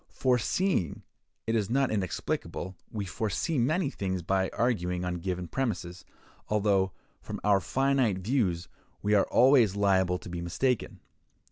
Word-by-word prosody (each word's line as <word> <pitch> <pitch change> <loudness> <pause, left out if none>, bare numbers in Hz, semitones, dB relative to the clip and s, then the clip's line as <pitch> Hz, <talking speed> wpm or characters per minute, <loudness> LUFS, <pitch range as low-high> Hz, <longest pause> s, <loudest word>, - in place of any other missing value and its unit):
Foreseeing 125 - +1 0.4
it 115 - -1
is 110 -3 0
not 135 +2 +2
inexplicable: 95 -2 -3
we 105 -3 -4
foresee 110 - -1
many 145 +5 +1
things 95 -6 -3
by 95 +2 +1
arguing 90 -7 -1
on 90 0 -2
given 90 0 -3
premises, 95 -7 -3 0.4
although, 100 -3 +2 0.3
from - - -6
our 100 -1 +5
own - - -3
finite 135 -1 +1
views, 95 -5 0 0.4
we 105 +1 +2
are 100 - +4
always 120 -5 +5
liable 95 -3 +2
to - - -11
be 85 -1 -5
mistaken. 120 +9 -1
100 Hz, 140 wpm, -29 LUFS, 90-125 Hz, 0.4 s, our